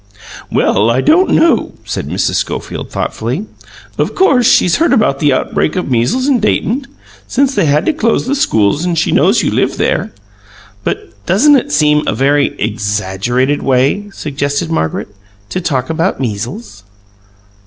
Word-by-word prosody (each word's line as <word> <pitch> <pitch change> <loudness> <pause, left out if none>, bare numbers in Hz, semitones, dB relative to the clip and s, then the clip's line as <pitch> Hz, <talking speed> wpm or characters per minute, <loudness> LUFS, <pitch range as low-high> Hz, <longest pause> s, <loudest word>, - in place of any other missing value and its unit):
"Well, 110 - +2
I 120 +2 +2
don't 355 - +3
know," 335 - +2
said - - -4
Mrs. - - -1
Schofield - - -4
thoughtfully. 125 - -3 0.5
"Of - - -1
course 265 - +3
she's 175 - +3
heard 335 +2 +2
about 140 -11 +2
the 145 -2 +2
outbreak 130 - -1
of 180 -7 -3
measles 125 - +1
in 270 -4 +3
Dayton, 235 +5 -1 0.4
since 275 +1 +1
they 175 - +1
had 150 +3 +2
to - - +2
close 235 -7 0
the 260 - -1
schools, 110 - +1
and 175 -2 -1
she 160 - +1
knows - - +3
you - - 0
live - - 0
there - - -1 0.4
" 100 -1 -25
"But 105 -3 -5
doesn't 285 +11 +5
it 280 +2 0
seem 150 -1 +3
a - - 0
VERY 140 +1 +1
exaggerated 105 +5 -1
way," 135 +11 +1
suggested 140 -4 -3
Margaret, 80 +3 -2 0.4
"to 185 - -3
talk 135 -5 -2
about 165 +4 -1
measles?" 105 -3 -5
145 Hz, 160 wpm, -14 LUFS, -, 0.5 s, doesn't